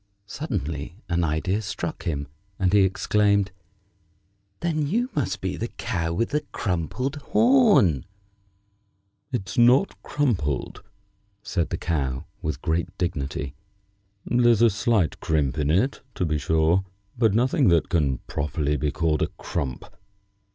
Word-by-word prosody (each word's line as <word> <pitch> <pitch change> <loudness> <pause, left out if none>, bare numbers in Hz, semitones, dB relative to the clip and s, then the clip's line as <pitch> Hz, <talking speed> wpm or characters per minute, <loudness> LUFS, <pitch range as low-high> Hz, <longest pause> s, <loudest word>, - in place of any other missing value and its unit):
Suddenly 85 - -4
an 85 0 +1
idea 85 +6 0
struck 105 - -5
him, 70 -3 -2 0.3
and 95 -1 +1
he 105 - +6
exclaimed: 100 +1 +2 1.1
"Then 155 -4 0
you 235 - 0
must 95 -10 -1
be 95 -1 -2
the 115 - -2
Cow 85 -7 -3
with 115 +10 -1
a 150 - +3
crumpled 110 - -2
horn!" 210 - +4 1.2
"It's 95 -6 -2
not 125 +10 +4
crumpled," 90 - -1 0.6
said 85 -5 -1
the - - -2
Cow, 70 -3 -2 0.2
with 75 -3 -4
great 85 +3 -1
dignity. 75 -5 -3 0.7
"There's 120 -2 +4
a 115 - +6
slight 100 -4 +1
crimp 75 -2 0
in 75 -1 +1
it, 100 - +1
to 90 - 0
be 75 -2 0
sure, 80 +6 +2 0.3
but 110 -4 +2
nothing 130 +3 +3
that 85 -2 +3
can 70 -6 +1
properly 75 0 -1
be 75 - 0
called 75 +1 0
a - - +2
crump. 65 -4 -4
90 Hz, 130 wpm, -25 LUFS, 75-120 Hz, 1.2 s, he